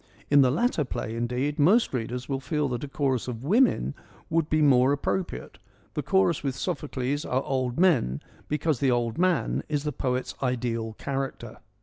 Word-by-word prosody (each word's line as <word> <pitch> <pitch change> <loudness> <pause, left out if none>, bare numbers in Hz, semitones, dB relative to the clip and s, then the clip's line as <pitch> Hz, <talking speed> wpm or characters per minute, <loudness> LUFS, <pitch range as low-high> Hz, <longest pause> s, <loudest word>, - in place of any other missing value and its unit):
In 145 -1 +7
the 130 - +5
latter 165 - +1
play, 115 -4 -4
indeed, 125 +5 -2
most 195 - +4
readers 125 +1 -3
will 135 -1 -2
feel 150 +1 -1
that 120 0 -3
a - - -3
chorus 135 -3 -1
of 120 -1 -5
women 180 - +3 0.4
would 160 -1 +1
be 155 - +2
more 130 -2 +5
appropriate; 170 +5 -3 0.3
the - - -2
chorus 190 -5 +2
with 135 -3 -2
Sophocles 145 -5 -2
are 130 +2 -1
old 130 -1 -1
men 130 - +3 0.3
because 150 -2 0
the 135 - +2
old 120 +1 0
man 175 -10 +1
is 145 -2 -1
the 150 - -1
poet's 130 -2 -2
ideal 120 -3 -1
character. 135 -2 -5
135 Hz, 170 wpm, -26 LUFS, 125-150 Hz, 0.4 s, In